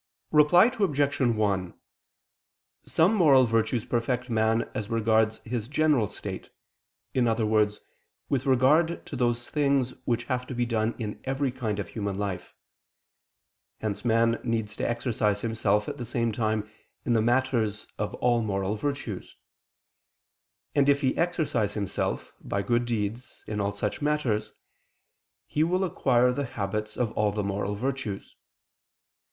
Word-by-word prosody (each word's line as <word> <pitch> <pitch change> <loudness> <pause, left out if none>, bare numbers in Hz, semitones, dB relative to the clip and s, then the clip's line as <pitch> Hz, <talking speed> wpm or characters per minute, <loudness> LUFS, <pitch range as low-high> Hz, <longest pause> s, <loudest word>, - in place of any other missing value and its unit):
Reply 175 +9 +6
Obj. 145 -7 +1
1: 105 -7 +1 1.1
Some 170 +7 +3
moral 145 -10 +6
virtues 115 0 0
perfect 125 +1 -1
man 110 +1 +2
as 105 -2 -4
regards 110 -1 +2
his 115 -1 -3
general 145 -5 +2
state, - - -7 0.6
in 125 -2 +2
other 110 -1 +1
words, 105 -1 +2 0.5
with 135 -1 -1
regard 150 +6 +3
to - - -7
those 120 -1 0
things 140 -4 +1
which 120 -1 0
have 125 +1 -2
to 130 - -5
be 120 0 +1
done 115 -1 0
in 105 -3 -5
every 135 0 0
kind 115 -5 -3
of 100 -4 -4
human 100 -3 -3
life. 100 -3 -4 1.2
Hence 105 -1 -3
man 115 0 +3
needs 115 -3 -2
to - - -1
exercise 110 -4 0
himself 105 -2 +1
at 145 - -4
the 125 - -5
same 115 0 0
time 110 -1 -1 0.4
in 120 - +2
the 115 - +3
matters 115 -3 +1
of 105 - -2
all 120 -1 +2
moral 100 -2 -1
virtues. 115 -3 -4 1.4
And 140 0 +3
if 140 0 +3
he 130 -2 +1
exercise 160 - 0
himself, 100 -3 -2
by 100 0 -2
good 120 +2 +1
deeds, 115 +1 -4
in 105 -1 -3
all 100 0 0
such 105 +5 -3
matters, 130 -8 0 0.9
he 150 - 0
will 180 +3 +1
acquire 125 -8 +3
the 140 +3 -2
habits 105 -3 -4
of 120 -3 0
all 105 -1 +1
the 105 0 -2
moral 100 +1 -2
virtues. 125 -4 -4
115 Hz, 145 wpm, -27 LUFS, 105-130 Hz, 1.4 s, Reply